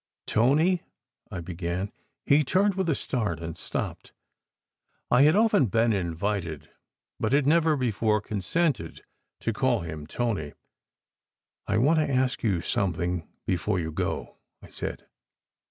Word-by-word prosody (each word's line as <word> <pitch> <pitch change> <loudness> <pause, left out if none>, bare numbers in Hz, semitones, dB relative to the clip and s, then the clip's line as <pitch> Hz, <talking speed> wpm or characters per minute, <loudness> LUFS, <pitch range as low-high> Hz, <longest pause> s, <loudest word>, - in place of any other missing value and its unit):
" - - -65
Tony! 155 +10 +3 0.2
" - - -44
I 90 - -4
began. 90 +3 -3 0.3
He 145 +2 +5
turned 195 +8 +2
with 190 -2 -1
a 155 - +2
start, 105 -14 -2
and 85 -1 -5
stopped. - - -5 1.0
I 125 - +6
had 150 +4 +6
often 210 - +4
been 115 +2 +2
invited, 85 -3 -2 0.5
but 110 - 0
had 140 -1 +4
never 160 +1 +4
before 110 -4 +1
consented, 105 - -1 0.4
to 115 - -1
call 120 -2 +1
him 80 -3 -6
Tony. 100 -9 -2 1.1
"I 105 - +1
want 150 +8 +4
to 150 -2 +1
ask 130 -1 +1
you 95 -7 +1
something 90 -2 -1 0.2
before 90 +2 0
you 80 -1 -3
go," - - -3 0.2
I - - -14
said. - - -6
110 Hz, 140 wpm, -27 LUFS, 85-140 Hz, 1.1 s, I